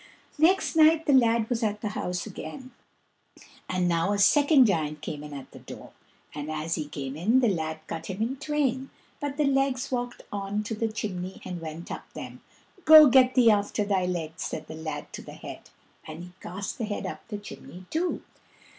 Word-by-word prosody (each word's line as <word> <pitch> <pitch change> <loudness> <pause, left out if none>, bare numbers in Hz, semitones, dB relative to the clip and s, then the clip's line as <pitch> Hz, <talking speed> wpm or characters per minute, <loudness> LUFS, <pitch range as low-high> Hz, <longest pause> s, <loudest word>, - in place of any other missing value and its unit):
Next 350 +3 +3
night 320 0 +5
the 285 - +3
lad 230 -3 +4
was 240 -1 -1
at 210 -2 -1
the 210 - -2
house 180 -3 -3
again, 255 +5 -8 1.0
and 180 -1 +1
now 170 +3 +1
a - - 0
second 285 +5 +6
giant 155 -7 0
came 150 -1 -5
in 150 - -9
at 140 -2 -9
the - - -12
door, - - -11 0.4
and 150 0 -5
as 155 +1 -2
he 155 -3 -2
came 135 -2 -5
in 215 +11 +3
the 250 - +3
lad 160 -5 -2
cut 160 - -6
him 190 0 -5
in 240 +5 -1
twain, 275 -3 -1 0.3
but 285 -1 -4
the 300 - +2
legs 270 -2 +1
walked 245 -1 -3
on 205 +1 -2
to 220 - -4
the 225 0 -1
chimney 190 -4 -5
and 180 -2 -5
went 160 +1 -7
up - - -7
them. - - -8 0.4
"Go, 310 -1 +10
get 255 0 +5
thee 240 -3 +6
after 205 0 0
thy 190 -3 +1
legs," 165 -3 -4
said - - -4
the - - -9
lad 160 0 -6
to - - -6
the - - -11
head, - - -10 0.4
and 160 +2 -8
he 180 - -11
cast 195 +6 -6
the 225 - -1
head 205 -1 -4
up - - -7
the 210 - -5
chimney 185 -3 -11
too. 345 +3 -1
205 Hz, 200 wpm, -27 LUFS, 170-260 Hz, 1.0 s, Go